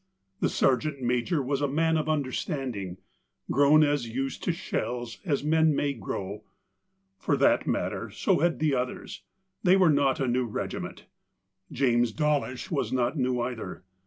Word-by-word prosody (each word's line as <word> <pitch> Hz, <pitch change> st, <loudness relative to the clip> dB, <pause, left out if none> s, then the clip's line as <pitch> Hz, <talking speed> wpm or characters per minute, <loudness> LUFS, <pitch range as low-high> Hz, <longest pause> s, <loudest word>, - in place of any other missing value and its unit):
The -, -, +1 dB
sergeant 135 Hz, +1 st, +1 dB
major 125 Hz, +6 st, +1 dB
was 140 Hz, +2 st, -1 dB
a 145 Hz, -, +2 dB
man 160 Hz, +3 st, +1 dB
of 155 Hz, 0 st, 0 dB
understanding, 130 Hz, -, -2 dB, 0.5 s
grown 145 Hz, +3 st, +6 dB
as 145 Hz, -5 st, 0 dB
used 135 Hz, +3 st, -3 dB
to -, -, +2 dB
shells 120 Hz, -8 st, -4 dB
as 145 Hz, -6 st, 0 dB
man 160 Hz, 0 st, +3 dB
may 140 Hz, 0 st, 0 dB
grow. 100 Hz, -2 st, -5 dB, 0.8 s
For -, -, +1 dB
that -, -, +3 dB
matter -, -, -2 dB
so -, -, +1 dB
had 170 Hz, +2 st, +2 dB
the 155 Hz, -2 st, +1 dB
others 125 Hz, -1 st, -3 dB, 0.2 s
— 190 Hz, 0 st, -50 dB
they 185 Hz, 0 st, +6 dB
were 180 Hz, -4 st, +5 dB
not 140 Hz, -2 st, +2 dB
a 135 Hz, -, 0 dB
new 125 Hz, 0 st, +1 dB
regiment. 105 Hz, -, -5 dB, 0.7 s
James 120 Hz, -3 st, +2 dB
Dawlish 150 Hz, -2 st, -1 dB
was 145 Hz, -, -1 dB
not 125 Hz, +2 st, +1 dB
new 125 Hz, -3 st, 0 dB
either. 115 Hz, -7 st, -5 dB
135 Hz, 160 wpm, -27 LUFS, 125-155 Hz, 0.8 s, grown